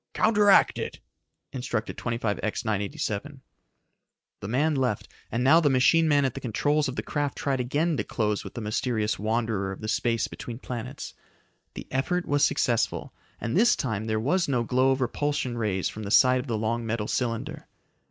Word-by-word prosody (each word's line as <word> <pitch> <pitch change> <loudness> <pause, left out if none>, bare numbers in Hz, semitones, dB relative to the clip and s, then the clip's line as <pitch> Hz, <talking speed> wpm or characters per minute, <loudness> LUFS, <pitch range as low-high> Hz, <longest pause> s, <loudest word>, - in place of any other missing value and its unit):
"Counteract 210 -2 +4
it," - - -5 0.5
instructed 125 -3 -3
25X 115 -3 -2
987. 105 +6 -3 1.0
The 100 - -6
man 145 +8 +1
left, 130 -6 -1 0.2
and 115 +2 0
now 150 +6 +6
the 155 -4 +3
machine 140 +5 +4
man 145 -2 +3
at 130 - -1
the - - -6
controls 145 +6 0
of 130 - -4
the - - -3
craft 145 -2 -2
tried 135 -2 -1
again 150 +7 0
to - - 0
close 105 -3 -1
with - - -10
the 120 - -4
mysterious 105 -1 -1
wanderer 110 -2 -1
of 95 - -8
the 110 - -4
space 115 0 0
between 115 -2 -7
planets. 120 -3 -6 0.6
The - - -7
effort 175 +7 0
was 145 0 +1
successful, 120 -5 +1 0.3
and 115 +1 -3
this 235 +3 +5
time 110 -4 -2
there 110 -1 0
was 170 +10 +1
no 125 -4 +1
glow 130 +3 +2
of 135 0 +1
repulsion 130 0 -1
rays 105 -5 -1
from 110 - -6
the 100 - -5
side 130 +3 +5
of 125 - -6
the 115 -3 -1
long 115 +2 -1
metal 115 -2 -2
cylinder. 115 -3 -3
125 Hz, 180 wpm, -26 LUFS, 110-140 Hz, 1.0 s, now